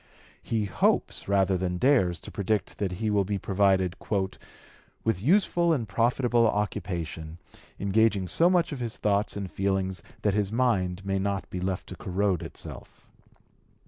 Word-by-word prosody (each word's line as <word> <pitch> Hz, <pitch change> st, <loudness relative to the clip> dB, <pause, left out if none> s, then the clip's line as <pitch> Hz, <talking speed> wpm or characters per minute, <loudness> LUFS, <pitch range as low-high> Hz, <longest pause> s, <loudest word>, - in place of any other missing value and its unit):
He 110 Hz, -2 st, -1 dB
hopes 95 Hz, -, 0 dB
rather 95 Hz, -2 st, +2 dB
than 90 Hz, -1 st, -1 dB
dares 95 Hz, -, +3 dB
to -, -, -9 dB
predict 105 Hz, +1 st, -2 dB
that 95 Hz, -3 st, -1 dB
he 110 Hz, +4 st, -1 dB
will 100 Hz, -1 st, +3 dB
be 100 Hz, +1 st, -2 dB
provided 95 Hz, -2 st, +2 dB, 1.1 s
"with 105 Hz, -5 st, 0 dB
useful 170 Hz, -, +3 dB
and 120 Hz, -8 st, -1 dB
profitable 120 Hz, 0 st, +2 dB
occupation, 85 Hz, -6 st, -3 dB, 0.4 s
engaging 100 Hz, -1 st, +2 dB
so 165 Hz, -, +4 dB
much 180 Hz, -1 st, +2 dB
of 140 Hz, -, -5 dB
his 115 Hz, -2 st, -3 dB
thoughts 105 Hz, 0 st, 0 dB
and 100 Hz, -, -3 dB
feelings 95 Hz, -2 st, -1 dB, 0.2 s
that 105 Hz, -, +2 dB
his 100 Hz, -1 st, 0 dB
mind 100 Hz, -6 st, 0 dB
may 95 Hz, 0 st, 0 dB
not 100 Hz, 0 st, -2 dB
be 90 Hz, -, -3 dB
left 95 Hz, 0 st, -2 dB
to -, -, -7 dB
corrode 95 Hz, -1 st, 0 dB
itself." -, -, -9 dB
100 Hz, 150 wpm, -27 LUFS, 95-115 Hz, 1.1 s, so